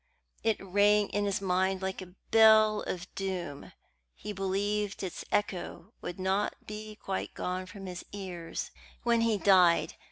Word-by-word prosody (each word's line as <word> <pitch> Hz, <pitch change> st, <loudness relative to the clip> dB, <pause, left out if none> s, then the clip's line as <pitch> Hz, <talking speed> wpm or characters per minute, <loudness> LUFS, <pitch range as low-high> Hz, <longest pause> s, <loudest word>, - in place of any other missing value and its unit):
It 225 Hz, -2 st, +2 dB
rang 205 Hz, +2 st, +3 dB
in 205 Hz, +1 st, 0 dB
his 200 Hz, -1 st, -1 dB
mind 190 Hz, 0 st, +1 dB
like 190 Hz, 0 st, -3 dB
a 180 Hz, 0 st, -11 dB, 0.2 s
bell 220 Hz, -1 st, +6 dB
of 180 Hz, 0 st, -5 dB
doom. 180 Hz, -7 st, -4 dB, 0.4 s
He 210 Hz, -, -6 dB
believed 200 Hz, +1 st, -1 dB
its 185 Hz, -, -5 dB
echo 195 Hz, 0 st, -2 dB
would 175 Hz, -, -6 dB
not 190 Hz, +2 st, 0 dB
be 215 Hz, 0 st, -7 dB
quite 195 Hz, -2 st, -4 dB
gone 185 Hz, +1 st, -3 dB
from 195 Hz, +1 st, -9 dB
his 180 Hz, -1 st, -6 dB
ears 180 Hz, -4 st, -5 dB, 0.3 s
when 235 Hz, -1 st, +3 dB
he 230 Hz, -2 st, +2 dB
died. 180 Hz, -5 st, +5 dB
195 Hz, 150 wpm, -30 LUFS, 185-210 Hz, 0.4 s, bell